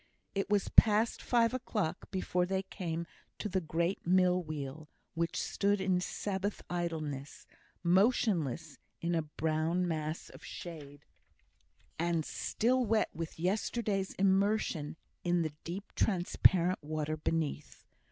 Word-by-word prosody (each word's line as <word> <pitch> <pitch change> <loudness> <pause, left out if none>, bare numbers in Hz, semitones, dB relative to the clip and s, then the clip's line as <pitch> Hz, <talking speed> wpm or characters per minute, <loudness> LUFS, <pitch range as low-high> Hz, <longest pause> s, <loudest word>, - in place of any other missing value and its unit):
It 195 0 -1
was 205 -1 +2
past 220 +1 +5
five 235 -1 +3
o'clock 210 -9 -2
before 180 -2 0
they 190 0 0
came 170 -3 -4 0.3
to - - -3
the 190 -2 0
great 170 +3 -1
mill 180 0 +4
wheel, 155 -1 -6 0.2
which 170 0 -1
stood 205 0 +1
in 185 -1 +2
Sabbath 200 +2 -2
idleness, 155 -5 -3 0.4
motionless 170 - +2 0.2
in 170 +1 -1
a 165 - +2
brown 160 +3 0
mass 155 -1 -3
of - - -13
shade, 150 -4 -8 0.9
and 170 -2 +1
still 250 +3 +1
wet 220 -1 +2
with 165 0 -6
yesterday's 195 +2 0
immersion 195 -5 +2 0.3
in 175 -1 +2
the 155 -2 -3
deep 190 +5 -6
transparent 180 -1 +3
water 155 0 -2
beneath. 155 -1 -2
175 Hz, 125 wpm, -33 LUFS, 160-195 Hz, 0.9 s, past